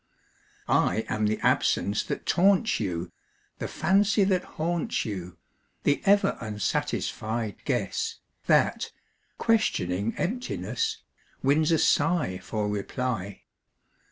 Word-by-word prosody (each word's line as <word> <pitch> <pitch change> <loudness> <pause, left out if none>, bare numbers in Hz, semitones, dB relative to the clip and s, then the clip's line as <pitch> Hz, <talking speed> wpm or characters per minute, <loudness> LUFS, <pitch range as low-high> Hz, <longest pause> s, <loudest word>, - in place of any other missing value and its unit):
I 110 - +2
am 110 -1 +1
the 110 - 0
absence 100 +2 +2
that - - -4
taunts 200 +4 +3
you, 90 -4 -3 0.5
The - - -3
fancy 200 +2 +3
that 190 -2 +2
haunts 170 +1 -1
you; 90 -5 -5 0.5
The 145 - +2
ever 200 +1 +4
unsatisfied 110 0 -2
guess - - -1 0.3
That, - - +2 0.5
questioning 110 - +1
emptiness, 440 - -2 0.4
Wins 150 +4 +3
a 165 - +4
sigh 145 - +2
for 105 +2 -3
reply. 105 -1 -3
125 Hz, 100 wpm, -27 LUFS, -, 0.5 s, ever